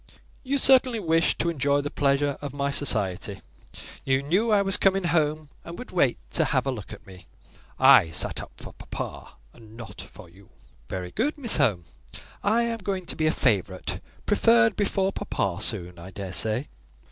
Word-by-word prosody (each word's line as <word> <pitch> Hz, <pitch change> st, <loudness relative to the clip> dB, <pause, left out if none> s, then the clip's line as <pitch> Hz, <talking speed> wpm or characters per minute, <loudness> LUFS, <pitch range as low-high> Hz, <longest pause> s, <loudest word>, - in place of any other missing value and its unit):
"You 275 Hz, +1 st, -1 dB
certainly 260 Hz, -3 st, +4 dB
wished 165 Hz, -3 st, +1 dB
to 170 Hz, -, 0 dB
enjoy 145 Hz, -2 st, +1 dB
the 145 Hz, -, -5 dB
pleasure 140 Hz, 0 st, +1 dB
of 145 Hz, -1 st, -6 dB
my 140 Hz, 0 st, -1 dB
society. 100 Hz, -8 st, +1 dB, 0.6 s
You 135 Hz, 0 st, +1 dB
knew 190 Hz, +11 st, +1 dB
I 205 Hz, -2 st, +4 dB
was 195 Hz, 0 st, +2 dB
coming 195 Hz, -1 st, +2 dB
home, 155 Hz, -3 st, 0 dB
and 170 Hz, 0 st, -9 dB
would 250 Hz, -, -9 dB
wait 140 Hz, -9 st, +2 dB
to -, -, +1 dB
have -, -, 0 dB
a 135 Hz, -, 0 dB
look 110 Hz, -6 st, -8 dB
at -, -, -11 dB
me." 95 Hz, -2 st, -14 dB, 0.5 s
"I 80 Hz, -, +6 dB
sat 80 Hz, -, -2 dB
up -, -, -11 dB
for -, -, -11 dB
papa, -, -, -8 dB, 0.2 s
and 110 Hz, 0 st, -16 dB
not 110 Hz, -4 st, -9 dB
for -, -, -13 dB
you." 95 Hz, +4 st, -20 dB, 0.4 s
"Very 90 Hz, -1 st, -5 dB
good, 295 Hz, +6 st, -1 dB
Miss 245 Hz, -6 st, +1 dB
Home. 105 Hz, -, +1 dB, 0.6 s
I 225 Hz, +3 st, +2 dB
am 230 Hz, -1 st, -2 dB
going 190 Hz, -2 st, -4 dB
to -, -, 0 dB
be 155 Hz, -, 0 dB
a -, -, +3 dB
favourite: 100 Hz, -, -1 dB, 0.3 s
preferred 115 Hz, 0 st, +4 dB
before 195 Hz, -1 st, 0 dB
papa -, -, -3 dB
soon, 90 Hz, 0 st, -1 dB
I 85 Hz, +2 st, -10 dB
daresay." 105 Hz, +6 st, -1 dB
145 Hz, 180 wpm, -25 LUFS, -, 0.6 s, I